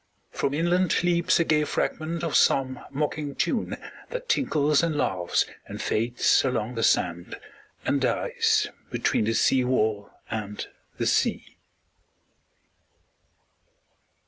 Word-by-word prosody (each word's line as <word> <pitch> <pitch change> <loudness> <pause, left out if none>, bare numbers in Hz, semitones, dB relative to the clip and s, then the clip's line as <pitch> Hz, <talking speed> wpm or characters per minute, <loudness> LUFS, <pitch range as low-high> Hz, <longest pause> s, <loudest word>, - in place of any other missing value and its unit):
From 140 - -1
inland 175 +2 +2
Leaps 175 -1 +2
a - - +4
gay 155 -2 +2
fragment 160 +2 -2
of 165 - -1
some 130 -1 +3
mocking 145 0 -3
tune, 220 +7 -1 0.3
That - - -5
tinkles 150 - +2
and 165 -3 -1
laughs 90 -10 +1 0.2
and - - -7
fades 120 +3 +2
along 125 -3 -1
the 115 - -3
sand, 85 -5 0 0.5
And 140 - +1
dies 450 - +1 0.2
between 110 - 0
the 115 +1 0
seawall 110 -6 +2 0.2
and 105 -2 -4 0.3
the - - -1
sea. - - 0
145 Hz, 115 wpm, -26 LUFS, 115-170 Hz, 0.5 s, a